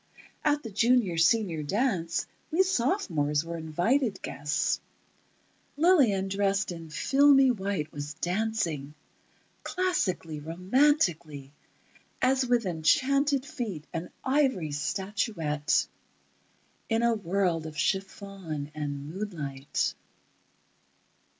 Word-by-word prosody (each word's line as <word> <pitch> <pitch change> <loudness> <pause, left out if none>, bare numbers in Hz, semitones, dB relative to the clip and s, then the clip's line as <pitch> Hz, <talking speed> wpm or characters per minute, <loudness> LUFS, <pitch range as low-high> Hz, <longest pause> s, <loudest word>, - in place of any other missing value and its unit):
At 295 0 +2
the 225 - -7
Junior 225 -5 +2
Senior 170 -2 +3
dance 180 - 0 0.2
we 350 +4 +3
sophomores 185 - 0
were 170 0 -5
invited 190 - 0
guests... 145 0 -1 1.0
Lillian 275 - +4
dressed 195 0 0
in 165 -2 -8
filmy 270 - +5
white 195 -8 -3
was 145 0 -6
dancing... 175 -7 -2 0.7
classically, 205 - -1
romantically, 170 - +1 0.7
as 260 +1 +3
with 240 -2 +2
enchanted 270 - +2
feet, 210 - -5
an 165 +2 -4
ivory 260 - +1
statuette, 165 - -1 1.0
in 225 0 +1
a 235 0 +4
world 180 -5 0
of 155 -1 -9
chiffon 190 -4 -3
and 145 -2 -4
moonlight. 150 -9 -3
190 Hz, 95 wpm, -28 LUFS, 155-245 Hz, 1.0 s, filmy